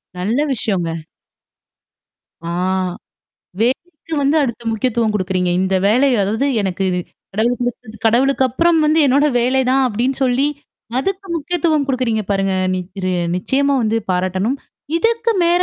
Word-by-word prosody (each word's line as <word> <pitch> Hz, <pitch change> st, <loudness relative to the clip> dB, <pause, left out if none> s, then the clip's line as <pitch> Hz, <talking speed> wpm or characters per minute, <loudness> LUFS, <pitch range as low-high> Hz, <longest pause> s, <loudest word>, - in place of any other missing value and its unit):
நல்ல 215 Hz, +10 st, 0 dB
விஷயங்க. 190 Hz, -7 st, -1 dB, 1.6 s
ஆ. -, -, -3 dB, 1.1 s
வேலைக்கு 305 Hz, +7 st, -2 dB
வந்து 285 Hz, +3 st, +2 dB
அடுத்த 235 Hz, -2 st, -3 dB
முக்கியத்துவம் 225 Hz, -1 st, 0 dB
குடுக்குறீங்க. 185 Hz, -2 st, 0 dB
இந்த 190 Hz, 0 st, 0 dB
வேலை 255 Hz, +7 st, +4 dB
அதாவது 220 Hz, +8 st, 0 dB, 0.2 s
எனக்கு 190 Hz, 0 st, -2 dB
இது 180 Hz, -, -1 dB, 0.4 s
கடவுள் 235 Hz, +3 st, +1 dB
குடுத்தது, 245 Hz, -2 st, -4 dB
கடவுளுக்கு 265 Hz, +4 st, +3 dB
அப்புறம் 335 Hz, +6 st, +2 dB
வந்து 310 Hz, +2 st, +3 dB
என்னோட 280 Hz, +3 st, +4 dB
வேலை 260 Hz, +2 st, +2 dB
தான் 270 Hz, +1 st, +3 dB
அப்படின்னு 245 Hz, +5 st, -1 dB
சொல்லி 260 Hz, +3 st, +2 dB, 0.5 s
அதுக்கு 390 Hz, +6 st, -2 dB
முக்கியத்துவம் 315 Hz, -2 st, 0 dB
குடுக்குறீங்க 250 Hz, -5 st, 0 dB
பாருங்க. 195 Hz, -1 st, +1 dB, 0.2 s
நிக் 185 Hz, +2 st, -6 dB
ரெ 185 Hz, -, 0 dB, 0.2 s
நிச்சயமா 280 Hz, +8 st, +1 dB
வந்து 220 Hz, +1 st, +1 dB
பாராட்டணும். 185 Hz, +7 st, 0 dB, 0.4 s
இதுக்கு 460 Hz, +4 st, +1 dB
மேல 350 Hz, +1 st, +3 dB
245 Hz, 130 wpm, -18 LUFS, 200-280 Hz, 1.6 s, வேலை